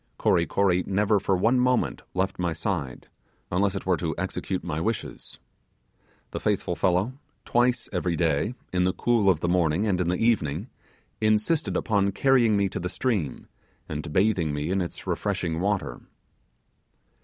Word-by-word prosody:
Kory 85 - +2
Kory 90 -2 +2
never 105 +1 +2
for 95 0 +1
one 115 +7 +3
moment 125 0 +1
left 95 0 -1
my 85 -2 0
side, 80 -5 -3 0.4
unless 95 +2 +1
it 95 - -5
were 90 -2 +2
to 80 -2 -2
execute 95 +2 -3
my 75 +2 -3
wishes. 110 +3 -4 0.9
The - - -4
faithful - - 0
fellow, 95 +9 0 0.3
twice 120 +1 +2
every 90 -1 0
day, 80 - 0 0.2
in 90 0 +2
the 95 - +1
cool 115 -5 +2
of 85 -4 +2
the 85 - 0
morning 85 +2 +2
and 95 -4 +1
in 85 - 0
the 90 +1 +1
evening, 105 - 0 0.5
insisted 110 +9 +2
upon 100 -2 +1
carrying 120 -4 +3
me 100 -1 +2
to - - -4
the 90 - -3
stream, 95 - -2 0.4
and 75 0 -5
bathing 90 -5 +2
me 75 +4 -2
in 95 0 +1
its 85 - -6
refreshing 90 -5 -1
water. 95 -10 -1
95 Hz, 160 wpm, -26 LUFS, 85-110 Hz, 0.9 s, one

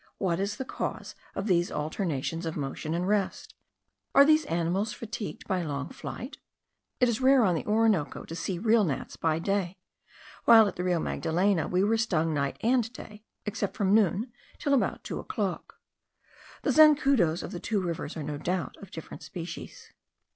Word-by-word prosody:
What 175 -3 0
is 200 +2 -1
the 265 - -5
cause - - -4 0.2
of 195 - -3
these 175 -4 +2
alternations 165 0 -2
of 160 - -4
motion 150 +3 -3
and 180 +2 -1
rest? 205 -2 -1 0.6
Are 280 - +9
these 310 0 +4
animals 175 +6 0
fatigued 215 -1 -6
by 185 -2 0
long 145 -2 -3
flight? 250 +5 -7 0.6
It 250 - +5
is 235 +1 -1
rare 265 -1 +6
on 185 -4 +3
the 160 - -2
Orinoco 210 -7 +2
to 165 - -8
see 180 +2 -3
real 220 +3 +3
gnats 150 -8 -3
by 160 -1 0
day; 190 +1 -1 0.7
while 225 -2 +8
at - - -4
the 180 - -3
Rio 180 -2 +1
Magdalena 175 +2 +1
we 180 +1 +1
were 220 +3 +2
stung 170 -8 +1
night 140 -2 -1
and 235 -1 +2
day, 210 -4 -11 0.2
except 205 -1 -3
from 200 -2 +2
noon 215 +3 +2 0.3
till 285 - 0
about 275 - +1
two - - -4
o'clock. - - -4 0.8
The - - +2
zancudos 275 - +5
of - - -6
the 175 - -5
two 210 +3 -1
rivers 170 -3 -4
are 155 - -4
no 145 0 -4
doubt 180 +1 -2
of 200 - -12
different 160 - -9
species. 180 - -8
190 Hz, 175 wpm, -28 LUFS, 165-225 Hz, 0.8 s, Are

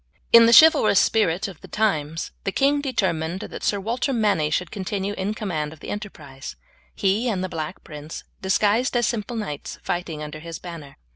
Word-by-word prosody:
In 230 0 +9
the - - +5
chivalrous 315 -11 +6
spirit 205 -2 +2
of 185 -5 -11
the - - -11
times 165 -7 -1
the 195 - -1
king 285 +5 +2
determined 185 - -1
that - - -8
Sir 205 - +1
Walter 235 +7 -1
Manny 205 - +1
should 180 +3 -1
continue 200 0 -3
in 205 +2 -3
command 160 -9 -3
of 160 - -16
the - - -9
enterprise; 155 - -8 0.4
he 205 +6 +1
and 190 -4 -1
the 185 - -3
Black 160 -3 -5
Prince, 150 +1 -8 0.2
disguised 210 +6 +2
as 240 - +2
simple 230 0 -2
knights, 150 -10 -5
fighting 170 -3 -3
under 150 0 -7
his 165 +1 -7
banner. 165 -6 -10
190 Hz, 185 wpm, -23 LUFS, 160-215 Hz, 0.4 s, In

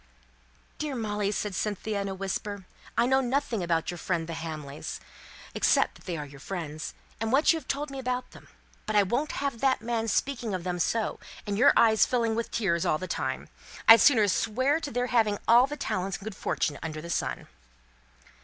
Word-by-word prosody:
"Dear 300 -3 -2
Molly," 210 -3 -1
said 210 -1 -2
Cynthia, 205 +2 -2
in 200 - -3
a 190 - -4
whisper, 195 +1 -4 0.3
"I 235 - +4
know 265 +2 +3
nothing 250 -4 -1
about 170 -1 0
your 175 - -7
friends 170 -2 -1
the 165 - -6
Hamleys, 155 -4 -6 0.5
except - - +3
that - - -18
they 175 -2 -3
are 150 - -5
your 140 -1 -13
friends, 155 -2 -5 0.2
and 225 0 -1
what 285 +6 +5
you 325 - -2
have - - -19
told 285 +1 -2
me 270 - -5
about 250 -1 -3
them. - - -15 0.4
But 215 - -1
I 205 - +6
won't 245 +10 -1
have 275 -5 -2
that 265 -1 +3
man 230 -1 -1
speaking 230 -1 -1
of 180 - -4
them 180 0 -2
so 220 +5 0 0.3
and 205 - -2
your 230 - +6
eyes 220 -2 +5
filling 230 -3 +1
with 230 +1 -2
tears 170 -7 0
all 155 - +2
the 185 - -6
time. 130 -6 -3 0.4
I'd 225 +1 +10
sooner 225 -7 +6
swear 260 - +1
to 310 -3 -5
their 245 0 -1
having 225 -4 +2
all 240 +3 +7
the 295 +1 -6
talents 190 -8 -2
and - - -14
good 215 -1 -6
fortune 145 -3 -1
under 155 -1 -5
the 170 +2 -6
sun." - - -2
215 Hz, 205 wpm, -28 LUFS, 180-250 Hz, 0.5 s, I'd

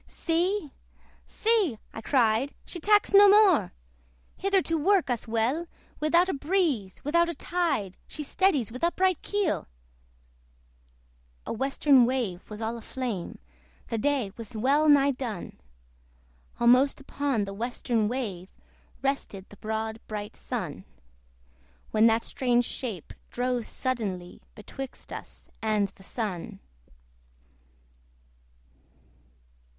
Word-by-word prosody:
See! 340 -1 -1 0.6
see! 430 - +1 0.2
(I 225 - -7
cried) 240 +1 +2
she 350 - -7
tacks 415 +4 +3
no 400 0 +9
more! 390 - +5 0.6
Hither 390 -1 +2
to 330 - -1
work 335 -3 +2
us 240 -1 -2
weal; 235 +9 0 0.3
Without 340 +4 +3
a 380 - -1
breeze, 290 - 0
without 340 +4 +2
a 340 - -4
tide, 320 - -1
She 305 - -6
steadies 290 - +1
with 255 +5 -8
upright 365 0 +2
keel! 410 -5 -1 1.8
The - - -3
western 270 +1 +4
wave 235 -9 -2
was 215 +1 -6
all 230 +1 -3
a - - -12
flame 235 -8 -4 0.5
The 230 - -1
day 265 -5 0
was 230 -1 -8
well 285 +7 +3
nigh 280 -1 +6
done! 240 - -6 1.0
Almost 250 +4 +4
upon 275 -5 -1
the 195 - -6
western 230 0 -1
wave 205 -7 -4 0.5
Rested 270 -8 -2
the 205 - -14
broad 220 +1 -3
bright 210 -1 -5
Sun; - - -5 1.1
When 220 +1 +5
that 225 0 +2
strange 245 -2 +1
shape 220 - -5 0.2
drove 245 -1 -1
suddenly 200 -9 -3
Betwixt 260 +5 -8
us - - -9
and 215 -2 +1
the - - -21
Sun. 195 -4 -4
255 Hz, 115 wpm, -27 LUFS, 220-315 Hz, 1.8 s, no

